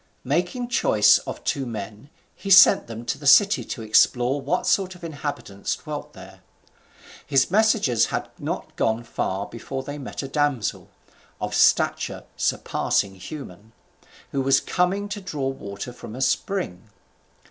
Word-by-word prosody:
Making 175 Hz, -, -1 dB
choice 110 Hz, -, +4 dB
of -, -, -6 dB
two 140 Hz, -3 st, -1 dB
men, 110 Hz, +1 st, -7 dB, 0.3 s
he 195 Hz, -, -7 dB
sent 195 Hz, 0 st, +7 dB
them 115 Hz, +1 st, -8 dB
to -, -, -3 dB
the 145 Hz, -, -4 dB
city 200 Hz, +9 st, +6 dB
to 115 Hz, -, -6 dB
explore 125 Hz, +5 st, +3 dB
what 150 Hz, +7 st, -1 dB
sort 190 Hz, -2 st, +1 dB
of 180 Hz, -, -16 dB
inhabitants 145 Hz, -10 st, -4 dB
dwelt -, -, -7 dB
there. -, -, -13 dB, 0.8 s
His 135 Hz, +1 st, +2 dB
messengers 200 Hz, -, +3 dB
had -, -, -3 dB
not -, -, -5 dB
gone 115 Hz, +1 st, 0 dB
far 100 Hz, -3 st, -3 dB
before 130 Hz, +4 st, -6 dB
they 145 Hz, +1 st, -7 dB
met 140 Hz, -, -6 dB
a -, -, -4 dB
damsel, 145 Hz, -6 st, -1 dB, 0.5 s
of -, -, -4 dB
stature -, -, +2 dB
surpassing 100 Hz, -1 st, 0 dB
human, 110 Hz, -, -10 dB, 0.6 s
who 135 Hz, -, -1 dB
was 135 Hz, 0 st, +4 dB
coming 190 Hz, +3 st, 0 dB
to 205 Hz, 0 st, -5 dB
draw 150 Hz, -8 st, -3 dB
water 110 Hz, -3 st, -6 dB
from 120 Hz, -2 st, -10 dB
a 130 Hz, -, -6 dB
spring. 120 Hz, -, -2 dB
135 Hz, 145 wpm, -24 LUFS, 110-175 Hz, 0.8 s, sent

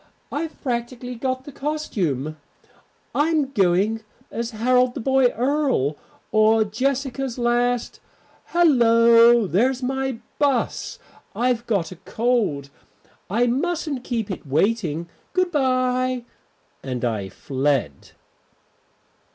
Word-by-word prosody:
I've 315 Hz, +2 st, -4 dB
practically 245 Hz, -1 st, -3 dB
got 255 Hz, +2 st, -3 dB
the 290 Hz, -, -9 dB
costume, 180 Hz, -, -2 dB, 0.8 s
I'm 295 Hz, -2 st, +1 dB
going 200 Hz, +1 st, +2 dB, 0.3 s
as 235 Hz, 0 st, -3 dB
Harold 250 Hz, +2 st, +2 dB
the -, -, -3 dB
Boy 265 Hz, +1 st, +3 dB
Earl, 250 Hz, -, 0 dB, 0.4 s
or 220 Hz, +1 st, +4 dB
Jessica's 260 Hz, +3 st, -2 dB
last 240 Hz, 0 st, 0 dB, 0.5 s
Hallo, 235 Hz, -7 st, +5 dB
there's 245 Hz, +8 st, +1 dB
my 265 Hz, -1 st, -1 dB, 0.2 s
bus; 280 Hz, -4 st, 0 dB, 0.4 s
I've 245 Hz, -1 st, 0 dB
got 195 Hz, -7 st, 0 dB
a 185 Hz, -, -9 dB
cold, 220 Hz, -, -1 dB, 0.6 s
I 230 Hz, +6 st, +2 dB
mustn't 285 Hz, +1 st, -1 dB
keep 225 Hz, -5 st, -3 dB
it 180 Hz, -, -7 dB
waiting. 170 Hz, +1 st, 0 dB, 0.3 s
Good 365 Hz, -1 st, +1 dB
bye." 255 Hz, -3 st, +1 dB, 0.6 s
And 125 Hz, -2 st, -3 dB
I 105 Hz, -5 st, -2 dB
fled. 130 Hz, -, -2 dB
240 Hz, 100 wpm, -23 LUFS, 205-265 Hz, 0.8 s, Hallo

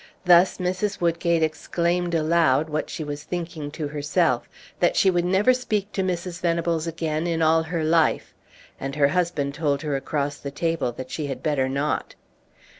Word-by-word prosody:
Thus 180 Hz, +1 st, +6 dB
Mrs. 185 Hz, +3 st, -2 dB
Woodgate 170 Hz, -1 st, +1 dB
exclaimed 170 Hz, +2 st, -1 dB
aloud, 160 Hz, -2 st, +2 dB
what 155 Hz, -, -2 dB
she 165 Hz, -, -4 dB
was 145 Hz, 0 st, -5 dB
thinking 165 Hz, -4 st, -5 dB
to 150 Hz, -1 st, -5 dB
herself, 145 Hz, -3 st, 0 dB, 0.3 s
that 175 Hz, -, +2 dB
she 190 Hz, -, +4 dB
would 175 Hz, -1 st, +1 dB
never 195 Hz, +7 st, +4 dB
speak 215 Hz, -5 st, -2 dB
to 195 Hz, -, -1 dB
Mrs. 180 Hz, -1 st, -3 dB
Venables 170 Hz, -1 st, 0 dB
again 160 Hz, 0 st, -2 dB
in 165 Hz, -1 st, 0 dB
all 160 Hz, +1 st, +4 dB
her 160 Hz, 0 st, -3 dB
life, 160 Hz, 0 st, +2 dB, 0.5 s
and 135 Hz, +1 st, -4 dB
her 140 Hz, -2 st, +4 dB
husband 170 Hz, -6 st, 0 dB
told 145 Hz, -1 st, -1 dB
her 150 Hz, -2 st, -1 dB
across 145 Hz, +1 st, -2 dB
the 140 Hz, -, -5 dB
table 160 Hz, -2 st, -1 dB
that 130 Hz, +1 st, -8 dB
she 150 Hz, -3 st, -3 dB
had 135 Hz, -2 st, -6 dB
better 140 Hz, -4 st, +1 dB
not. 140 Hz, +3 st, -2 dB
165 Hz, 175 wpm, -24 LUFS, 145-175 Hz, 0.5 s, Thus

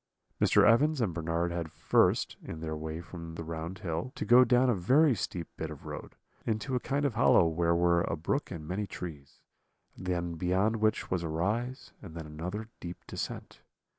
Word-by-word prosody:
"Mr. -, -, +5 dB
Evans 145 Hz, +7 st, +4 dB
and 105 Hz, -8 st, 0 dB
Bernard 85 Hz, +1 st, -1 dB
had 85 Hz, -2 st, -3 dB
first, -, -, +2 dB
in 80 Hz, -, -7 dB
their 80 Hz, -1 st, -3 dB
way 80 Hz, +1 st, -5 dB
from 85 Hz, -1 st, -9 dB
the 80 Hz, -, -5 dB
round 80 Hz, +3 st, -5 dB
hill, 85 Hz, +7 st, -3 dB
to -, -, -3 dB
go 125 Hz, +1 st, +8 dB
down 125 Hz, +1 st, +4 dB
a 125 Hz, -, +4 dB
very 130 Hz, -, +4 dB
steep 90 Hz, -5 st, -4 dB
bit -, -, -4 dB
of -, -, -10 dB
road, -, -, -7 dB, 0.3 s
into 110 Hz, +4 st, -2 dB
a 125 Hz, -, +2 dB
kind 140 Hz, +3 st, -1 dB
of 140 Hz, -, +1 dB
hollow 115 Hz, -6 st, +5 dB
where 85 Hz, +1 st, +2 dB
were 85 Hz, 0 st, +3 dB
a -, -, -1 dB
brook 110 Hz, -, -2 dB
and 80 Hz, -4 st, -7 dB
many 100 Hz, +4 st, -2 dB
trees, 75 Hz, -7 st, -8 dB, 0.5 s
and 90 Hz, -, -9 dB
then 85 Hz, -1 st, -1 dB
beyond 95 Hz, +6 st, +1 dB
which 110 Hz, +1 st, 0 dB
was 90 Hz, -2 st, +1 dB
a 85 Hz, -, -3 dB
rise, 110 Hz, -, -2 dB
and 85 Hz, -6 st, -10 dB
then 80 Hz, -2 st, -6 dB
another 90 Hz, +8 st, -5 dB
deep 85 Hz, 0 st, -6 dB
descent. -, -, -6 dB
90 Hz, 195 wpm, -30 LUFS, 80-115 Hz, 0.5 s, go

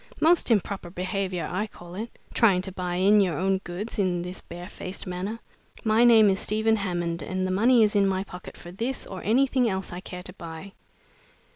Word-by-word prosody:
"Most 335 Hz, -1 st, +4 dB
improper 200 Hz, -4 st, 0 dB
behavior, 185 Hz, 0 st, -2 dB
I 200 Hz, +5 st, -2 dB
call 175 Hz, -3 st, -13 dB
it, 220 Hz, +5 st, -6 dB, 0.2 s
trying 195 Hz, -6 st, +4 dB
to 190 Hz, -, -5 dB
buy 180 Hz, -1 st, -3 dB
in 200 Hz, +4 st, +5 dB
your 180 Hz, -6 st, +2 dB
own 190 Hz, +1 st, +1 dB
goods 195 Hz, +5 st, -6 dB
in 180 Hz, -3 st, +1 dB
this 180 Hz, +1 st, -6 dB
bare 175 Hz, +1 st, -9 dB
faced 185 Hz, +1 st, -7 dB
manner. 185 Hz, +4 st, -4 dB, 0.5 s
My 220 Hz, +1 st, +4 dB
name 225 Hz, -3 st, +7 dB
is 190 Hz, -, -1 dB
Stephen 220 Hz, +1 st, +1 dB
Hammonde, 175 Hz, -4 st, -2 dB
and 185 Hz, +5 st, -2 dB
the 185 Hz, -, -1 dB
money's 220 Hz, +2 st, +4 dB
in 200 Hz, -1 st, +4 dB
my 190 Hz, 0 st, 0 dB
pocket 180 Hz, -2 st, -10 dB
for 175 Hz, -, -10 dB
this 235 Hz, +8 st, -3 dB
or 190 Hz, -2 st, -7 dB
anything 255 Hz, +1 st, +3 dB
else 190 Hz, -2 st, -3 dB
I 175 Hz, -, -5 dB
care 180 Hz, -1 st, -8 dB
to 180 Hz, -, -10 dB
buy." 170 Hz, +2 st, -9 dB
190 Hz, 195 wpm, -26 LUFS, 180-215 Hz, 0.5 s, name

